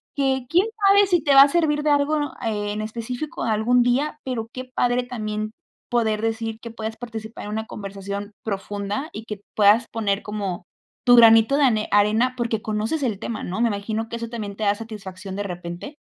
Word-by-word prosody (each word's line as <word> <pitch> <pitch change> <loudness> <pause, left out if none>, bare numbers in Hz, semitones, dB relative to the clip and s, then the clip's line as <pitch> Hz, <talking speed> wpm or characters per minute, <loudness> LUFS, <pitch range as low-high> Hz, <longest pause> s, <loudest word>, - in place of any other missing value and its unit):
que 265 -2 0
quién 360 - +3 0.2
sabe 400 0 +6
si 350 -3 +2
te 285 - +3
va 275 - +10
a 280 - +9
servir 295 -1 +1
de 300 - +1
algo, 290 +1 +3 0.3
eh, 205 -2 -1
en 215 - -3
específico 240 +7 -5
algún 230 +2 +3
día, 275 +5 +1
pero 235 -4 -3
qué 255 0 -6
padre 245 -1 +1
también 215 -3 -4 0.4
poder 220 -3 +1
decir 225 0 -2
que 235 - -8
puedas 220 -1 -6
participar 225 -2 -7
en - - -6
una 220 +1 -3
conversación 200 0 -6
profunda 205 +6 -3
y 220 - -8
que 210 -3 -7
puedas 215 +3 +5
poner 205 -3 0
como 200 -4 -4 0.4
tu 245 - +7
granito 225 +3 +7
de 295 - +3
ane 220 -5 +2
arena 215 +5 +3
porque 230 -2 -1
conoces 220 +8 -2
el 235 -7 -1
tema, 225 -1 -4
¿no? 185 +5 -4
¿Me 235 - +3
imagino 220 +2 -3
que 235 - -5
eso 230 0 -5
también 210 -4 -5
te 215 - -5
da 200 0 +3
satisfacción 195 -4 -8
de 205 - -2
repente? 175 - -7
225 Hz, 200 wpm, -23 LUFS, 210-250 Hz, 0.4 s, va